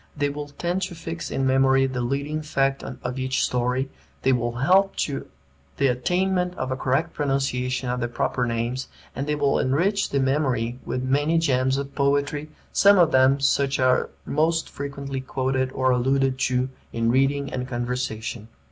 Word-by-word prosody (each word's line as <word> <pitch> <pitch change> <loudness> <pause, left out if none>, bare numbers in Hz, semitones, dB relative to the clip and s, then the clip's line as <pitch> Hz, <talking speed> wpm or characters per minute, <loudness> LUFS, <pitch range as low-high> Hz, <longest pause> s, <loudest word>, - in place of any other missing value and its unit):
They 145 0 +1
will 145 +1 -5
tend 175 +6 -2
to 180 -2 -3
fix 165 0 -6
in 135 - -1
memory 135 0 +4
the 130 -2 -2
leading 140 +5 -2
fact 135 -2 0
of 125 0 -5
each 130 0 0
story, 125 +2 -1 0.3
they 135 - +4
will 120 -1 0
help 185 +10 +3
to 140 -2 -5 0.5
the 140 - +2
attainment 180 +7 0
of 130 0 -3
a - - 0
correct 135 +6 0
pronunciation 135 -3 -1
of 125 0 -1
the 120 - -1
proper 125 +1 -1
names, 120 +3 -2 0.3
and 135 +2 -3
they 150 - +1
will 145 -2 +2
enrich 185 +10 +1
the 140 - 0
memory 130 -3 0
with 125 - -2
many 145 +5 +2
gems 130 -4 +2
of 140 0 -4
poetry, 145 +1 0 0.2
some 200 0 +6
of 170 -3 +5
them 130 +1 +4
such 140 0 +2
as 130 - +1
are 130 0 +3 0.2
most 165 +2 +1
frequently 140 -1 -5
quoted 130 0 -1
or 130 0 +1
alluded 130 +1 +1
to 130 0 +1 0.2
in 115 0 +1
reading 140 +2 +1
and 125 0 -3
conversation. 120 -3 -3
135 Hz, 175 wpm, -24 LUFS, 130-145 Hz, 0.5 s, some